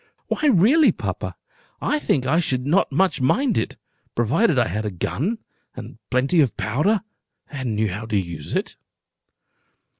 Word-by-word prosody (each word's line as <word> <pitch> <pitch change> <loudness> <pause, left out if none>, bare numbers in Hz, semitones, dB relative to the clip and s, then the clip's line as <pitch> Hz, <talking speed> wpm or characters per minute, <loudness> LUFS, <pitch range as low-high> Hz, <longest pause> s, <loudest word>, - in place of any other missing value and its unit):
"Why 300 - +1
really, 250 - +5
papa, - - -5 0.4
I 300 - 0
think 135 - 0
I 155 +6 +2
should 130 -6 -1
not 165 +4 +2
much 180 +1 +1
mind 245 - +2
it, - - -2 0.4
provided 145 - +2
I 120 - +3
had 105 +5 -3
a 105 - -2
gun, 150 - -2 0.4
and 120 0 -9
plenty 135 +6 +3
of 135 -6 0
powder, 155 - +1 0.5
and 130 -7 -3
knew 110 0 +1
how 105 +5 -5
to 110 -2 0
use 85 -6 -4
it." - - -2
135 Hz, 155 wpm, -22 LUFS, -, 0.5 s, really